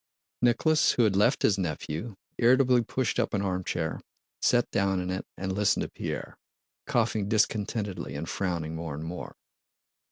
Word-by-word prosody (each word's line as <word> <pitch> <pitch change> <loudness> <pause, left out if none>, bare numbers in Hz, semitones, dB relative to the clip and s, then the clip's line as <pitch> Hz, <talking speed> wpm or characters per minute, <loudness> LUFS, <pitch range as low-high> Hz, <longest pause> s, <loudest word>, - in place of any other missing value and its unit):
Nicholas, 140 +6 +4
who 120 - +3
had 105 -3 +3
left 100 - +3
his 100 -2 +3
nephew, 85 +4 -3 0.2
irritably 125 0 +5
pushed 120 +1 -1
up - - 0
an 100 - 0
armchair, 90 -4 -2 0.4
sat 120 -1 +3
down 95 -1 +1
in 90 0 -2
it, 95 - -4
and 95 0 -2
listened 105 +1 +2
to - - -5
Pierre, - - -5 0.5
coughing 110 -4 +1
discontentedly 105 - 0
and 80 +3 -4
frowning 85 -4 -2
more 80 -2 -4
and 75 - -6
more. 85 +2 -6
100 Hz, 155 wpm, -28 LUFS, 90-115 Hz, 0.5 s, irritably